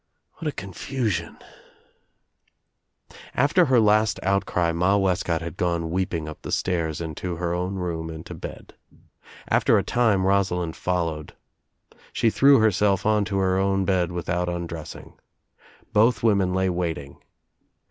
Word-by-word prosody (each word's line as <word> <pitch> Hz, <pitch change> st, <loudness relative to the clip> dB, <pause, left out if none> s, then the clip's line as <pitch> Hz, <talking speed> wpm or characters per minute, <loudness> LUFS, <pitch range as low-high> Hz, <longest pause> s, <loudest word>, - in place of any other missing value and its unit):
What 165 Hz, -, -4 dB
a -, -, 0 dB
con 95 Hz, -7 st, -8 dB
fusion 120 Hz, -7 st, -3 dB, 1.7 s
I -, -, -17 dB, 0.2 s
After 145 Hz, +7 st, +4 dB
her 130 Hz, -4 st, +4 dB
last 110 Hz, 0 st, +3 dB
outcry 90 Hz, -3 st, +1 dB
Ma 90 Hz, +4 st, +2 dB
Wescott 90 Hz, -4 st, 0 dB
had 85 Hz, +2 st, -7 dB
gone 85 Hz, -2 st, -1 dB
weeping 85 Hz, -3 st, -2 dB
up 80 Hz, -, -9 dB
the -, -, -7 dB
stairs 85 Hz, -4 st, -1 dB
and 80 Hz, -2 st, -5 dB
to 90 Hz, -2 st, -4 dB
her 85 Hz, 0 st, -2 dB
own 90 Hz, +2 st, -2 dB
room 85 Hz, -3 st, -3 dB
and 80 Hz, -1 st, -8 dB
to -, -, -8 dB
bed. -, -, -9 dB, 0.7 s
After -, -, +3 dB
a -, -, +1 dB
time 110 Hz, -6 st, +2 dB
Rosalind 90 Hz, -4 st, +1 dB
followed. 85 Hz, -4 st, -2 dB, 0.8 s
She 115 Hz, -, +2 dB
threw 140 Hz, +4 st, +6 dB
herself 105 Hz, -3 st, +2 dB
onto 105 Hz, -2 st, +1 dB
her 95 Hz, -1 st, +1 dB
own 95 Hz, 0 st, +1 dB
bed 90 Hz, -3 st, +1 dB
without 90 Hz, 0 st, -2 dB
undressing. 85 Hz, -2 st, -7 dB, 0.7 s
Both 110 Hz, +1 st, +3 dB
women 100 Hz, -5 st, +3 dB
lay 95 Hz, 0 st, +1 dB
waiting. 80 Hz, -6 st, -4 dB
90 Hz, 145 wpm, -24 LUFS, 85-100 Hz, 1.7 s, threw